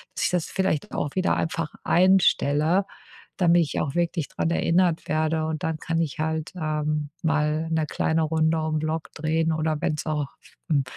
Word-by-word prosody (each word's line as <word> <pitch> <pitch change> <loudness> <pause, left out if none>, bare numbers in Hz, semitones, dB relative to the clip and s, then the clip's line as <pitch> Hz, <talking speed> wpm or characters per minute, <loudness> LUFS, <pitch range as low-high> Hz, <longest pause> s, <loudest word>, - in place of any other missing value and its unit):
Dass - - -2
ich - - +2
das 180 -2 0
vielleicht 190 -6 -1
auch 145 - -2
wieder 185 0 +2
einfach 160 -1 -2
einstelle, 180 -1 +3 0.5
damit 175 -1 +4
ich 150 - -3
auch 140 -1 -3
wirklich 170 -3 0
dran 165 - -1
erinnert 170 0 +2
werde, 155 +1 0
und 155 -2 -4
dann 160 -1 -1
kann 165 +1 -1
ich 160 -1 -3
halt, 160 0 -2
ähm, 150 -2 -1
mal 155 0 +1
'ne 160 -1 +1
kleine 160 +1 0
Runde 160 +1 +1
um 155 0 -1
Block 155 +1 -3
drehen 160 +1 0
oder 155 0 0
wenn's 150 0 -1
auch, 150 -3 -1 0.4
hm, 145 -4 +3
160 Hz, 175 wpm, -25 LUFS, 155-165 Hz, 0.5 s, damit